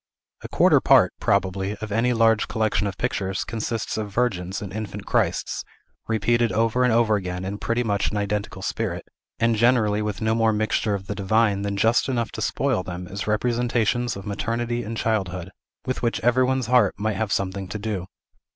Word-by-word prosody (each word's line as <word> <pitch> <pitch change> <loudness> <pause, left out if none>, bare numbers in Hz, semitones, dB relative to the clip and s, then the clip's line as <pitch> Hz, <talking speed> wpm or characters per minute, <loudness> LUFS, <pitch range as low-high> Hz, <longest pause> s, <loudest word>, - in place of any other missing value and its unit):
A - - -7
quarter - - +4
part, - - +5
probably, 95 +2 0
of 110 0 -7
any 115 +4 +2
large 115 -2 +3
collection 110 -2 0
of 95 -2 -5
pictures 95 -6 -2
consists 115 -1 -3
of 105 -1 -4
Virgins 95 -5 -1
and 100 -2 -7
infant 105 -2 -5
Christs, - - 0 0.4
repeated 115 +1 +2
over 115 +3 +2
and 125 - +3
over 110 -2 +3
again 90 -1 -4
in 100 +2 -4
pretty 115 +1 0
much 100 -3 0
an 105 - -3
identical 100 -1 -3
spirit, - - -3 0.3
and 115 0 +2
generally 110 -2 +3
with 105 -2 -3
no 110 0 +1
more 115 -1 +2
mixture 105 0 0
of 95 -1 -6
the 105 - -3
Divine 105 +1 +1
than 100 0 -2
just 115 +5 +3
enough 120 -3 -1
to - - -6
spoil 135 -7 0
them 90 0 -6
as 100 +2 -5
representations 120 +1 0
of 100 0 -8
maternity 115 +3 -2
and 115 +1 -5
childhood, 95 -5 -1 0.3
with 130 - -2
which 115 -1 0
everybody's 130 +1 +2
heart 120 -4 +3
might 105 +1 -1
have 110 -2 -2
something 95 0 -1
to 105 - -5
do. 100 -4 -4
110 Hz, 185 wpm, -24 LUFS, 100-115 Hz, 0.4 s, part